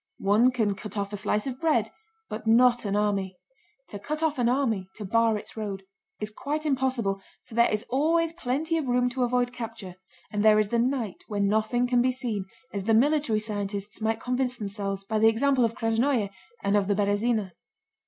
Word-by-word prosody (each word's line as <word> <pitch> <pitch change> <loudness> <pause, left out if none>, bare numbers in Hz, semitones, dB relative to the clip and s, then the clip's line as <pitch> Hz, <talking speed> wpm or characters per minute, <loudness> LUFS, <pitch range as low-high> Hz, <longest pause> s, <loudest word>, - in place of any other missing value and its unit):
One 210 +5 +4
can 225 -5 0
cut 205 +1 -8
off 200 0 -2
a - - -1
slice 210 +1 -1
of 260 -1 -4
bread, 265 -10 +2 0.4
but 215 +1 -6
not 240 +1 +5
an 200 0 0
army. 200 -3 0 0.5
To 205 - -7
cut 305 +9 -4
off 305 -4 0
an 240 -1 +3
army—to 220 -6 -1
bar 230 +2 +2
its - - -8
road—is 200 0 -7
quite 300 +7 -3
impossible, 255 -8 0 0.2
for - - -15
there 235 +1 +4
is 215 +2 -2
always 325 +5 +1
plenty 320 +2 -1
of 290 - -3
room 250 0 +2
to 255 +1 -3
avoid 245 0 +1
capture 225 -7 -7 0.3
and 210 0 -1
there 215 -1 +6
is 215 -1 +2
the 235 - +1
night 240 -5 -1
when 205 -2 0
nothing 220 +4 +1
can 245 -1 +3
be 255 +1 +3
seen, 240 -7 -3 0.3
as 200 -2 -3
the 225 0 +4
military 280 -2 +3
scientists 205 0 -4
might 220 +1 0
convince 250 0 -1
themselves 200 -2 -4
by 215 +2 -1
the 220 - +6
example 255 +3 +2
of 230 0 0
Krásnoe 225 -1 +1 0.3
and 200 - +2
of 200 -2 +2
the 205 - +2
Berëzina. 205 0 +1
225 Hz, 195 wpm, -27 LUFS, 205-250 Hz, 0.5 s, there